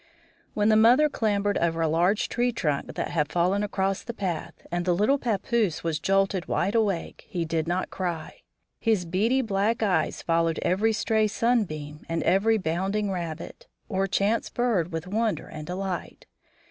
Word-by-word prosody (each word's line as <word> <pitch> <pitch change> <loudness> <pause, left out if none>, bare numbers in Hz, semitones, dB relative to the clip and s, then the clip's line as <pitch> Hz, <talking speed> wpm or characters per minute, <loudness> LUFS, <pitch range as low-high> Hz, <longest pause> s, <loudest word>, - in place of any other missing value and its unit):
When 210 0 +3
the 215 - +5
mother 240 +7 +6
clambered 205 -5 0
over 165 -1 0
a 165 - +2
large 175 +6 +2
tree 245 +1 0
trunk 150 -11 -2
that - - -2
had 150 -3 0
fallen 180 +3 +2
across 195 -1 -1
the 235 - -7
path 180 -7 -4
and 175 0 -1
the 175 -1 +2
little 255 +10 +2
pappoose 220 -5 0
was 165 -2 -1
jolted 195 +1 +1
wide 195 +4 0
awake, 205 -7 -1
he 175 -2 -2
did 160 0 -1
not 180 +2 -1
cry. 175 -4 -4 0.4
His 220 -6 +1
beady 220 +10 +1
black 220 +1 0
eyes 195 -4 0
followed 165 -1 +1
every 205 +5 +2
stray 220 0 +1
sunbeam 175 -11 -1
and 165 - -1
every 205 +5 +3
bounding 195 +3 -1
rabbit, 170 -3 -6 0.2
or 195 -2 0
chance 200 +4 +1
bird 220 -9 0
with 160 +1 -4
wonder 215 +3 -1
and 155 0 -8
delight. 185 0 -4
195 Hz, 165 wpm, -26 LUFS, 170-220 Hz, 0.4 s, mother